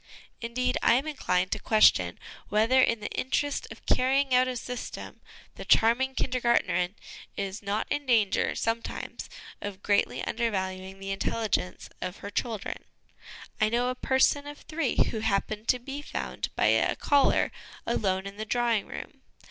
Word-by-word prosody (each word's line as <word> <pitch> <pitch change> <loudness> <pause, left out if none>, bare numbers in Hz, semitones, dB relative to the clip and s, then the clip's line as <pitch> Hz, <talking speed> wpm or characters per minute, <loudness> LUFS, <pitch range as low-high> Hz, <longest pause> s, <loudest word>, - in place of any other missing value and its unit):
Indeed, 250 +2 -1
I 235 - +5
am 265 +4 +1
inclined 185 -12 0
to 215 - -1
question 215 +1 +4 0.3
whether, 225 +5 +4
in 230 -3 +2
the 210 - -5
interest 285 +2 -1
of - - -12
carrying 265 +1 +2
out 255 +1 +5
a 255 - -2
system, 250 +1 -7 0.3
the - - -8
charming 255 +4 +3
Kindergartnerin 235 -8 +1 0.4
is 195 0 -3
not 205 +1 -1
in 290 -1 -1
danger 220 -6 +2
some 225 +1 0
times - - -7 0.3
of 200 -1 -6
greatly 200 -11 +1
undervaluing 190 -4 -2
the 195 0 -5
intelligence 195 -1 -1
of 180 - -4
her 200 - -8
children. 220 0 -3 0.7
I 215 -1 +3
know 240 +2 +1
a - - 0
person 265 +3 +2
of 290 0 -9
three 315 -4 -2 0.2
who 220 - -3
happened 215 +1 -1
to 250 - +4
be 270 +4 -7
found - - -4
by - - +2
a - - +3
caller 285 -1 +3 0.3
alone 190 -4 0
in 200 0 -8
the 215 - -3
drawing 235 -2 +1
room. - - -9
230 Hz, 155 wpm, -28 LUFS, 200-255 Hz, 0.7 s, I